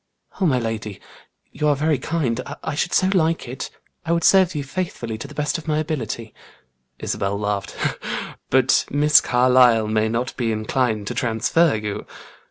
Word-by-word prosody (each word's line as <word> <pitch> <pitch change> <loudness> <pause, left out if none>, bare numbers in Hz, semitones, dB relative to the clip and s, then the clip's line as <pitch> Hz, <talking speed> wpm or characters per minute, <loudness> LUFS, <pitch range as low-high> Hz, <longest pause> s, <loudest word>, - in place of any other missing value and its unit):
"Oh, 185 - +4
my 130 -5 +2
lady, 110 -4 -4 0.5
you 150 - -1
are 145 - +4
very 150 0 +1
kind! 130 -6 -1 0.2
I - - -3
should 175 +4 -1
so 185 - +3
like 165 -6 +1
it! 130 +3 -6 0.3
I 165 - -2
would 170 0 +1
serve 185 -3 +5
you 145 - -2
faithfully 135 -7 -4
to 140 - -6
the 150 - -13
best 150 +4 -1
of 160 - -13
my 150 -1 +1
ability." 120 -8 -3 0.6
Isabel 100 +1 -2
laughed. 105 -1 -3 0.7
"But 130 0 +3
Miss 150 +1 +5
Carlyle 125 -3 +4
may 110 0 +1
not 120 +3 -2
be 115 -3 0
inclined 110 0 -1
to - - -3
transfer 125 +6 +2
you." 105 -1 -4
130 Hz, 170 wpm, -22 LUFS, 110-155 Hz, 0.7 s, serve